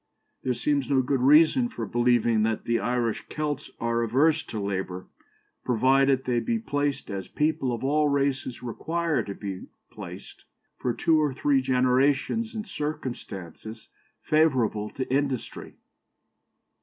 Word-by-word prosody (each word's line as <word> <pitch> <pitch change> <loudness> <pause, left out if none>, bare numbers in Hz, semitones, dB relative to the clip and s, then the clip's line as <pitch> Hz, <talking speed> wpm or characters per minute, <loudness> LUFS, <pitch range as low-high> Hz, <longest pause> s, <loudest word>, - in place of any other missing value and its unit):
There 125 -1 -1
seems 140 -1 0
no 135 -2 +3
good 135 +1 0
reason 155 - +5
for 255 - -5
believing 120 -2 +2
that 110 0 0
the 115 0 +1
Irish 120 -2 -1
Kelts 150 -2 -3
are 115 0 0
averse 145 +8 +3
to 110 - -5
labour, 95 -2 -3 0.6
provided 130 +2 +3
they 125 -2 +1
be 230 - -1
placed, 145 - -2
as 95 -1 -5
people 150 -4 0
of 120 0 -4
all 150 +2 +2
races 135 -3 -1
require 165 +7 -1
to 100 - -6
be 100 -3 -6 0.2
placed, - - -10 0.3
for 125 - 0
two 155 +6 +2
or 150 -2 +1
three 140 -1 +2
generations 135 - +1
in 215 - -3
circumstances 115 - -6 0.3
favourable 130 -9 +2
to 130 - -5
industry." 135 -3 -2
130 Hz, 135 wpm, -26 LUFS, 115-150 Hz, 0.6 s, reason